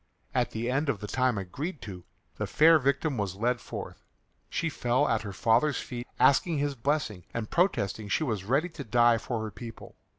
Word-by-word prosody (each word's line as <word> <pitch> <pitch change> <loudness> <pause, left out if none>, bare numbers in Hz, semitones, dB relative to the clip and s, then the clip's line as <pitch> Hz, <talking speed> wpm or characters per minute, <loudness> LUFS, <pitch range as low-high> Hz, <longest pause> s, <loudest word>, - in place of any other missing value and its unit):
At 125 -2 +1
the 115 +2 -3
end 135 +4 0
of 120 -7 0
the 105 - -6
time 130 +1 +1
agreed 140 - -4
to 90 -4 -8 0.3
the - - -2
fair 160 +1 +6
victim 140 +1 0
was 100 -3 -2
led 115 +2 0
forth. - - -7 0.5
She 165 - -1
fell 130 -2 +1
at 115 -2 +1
her 105 -2 -6
father's 115 - +2
feet 120 -1 -6
asking 155 +4 +4
his 145 0 0
blessing 130 - -1
and 115 -2 -3
protesting 110 - +1
she 155 - +1
was 110 -9 -2
ready 135 - +1
to 160 -4 -8
die 120 -1 +4
for 115 -1 -3
her 110 - -5
people. 115 +2 -10
120 Hz, 195 wpm, -28 LUFS, 110-145 Hz, 0.5 s, fair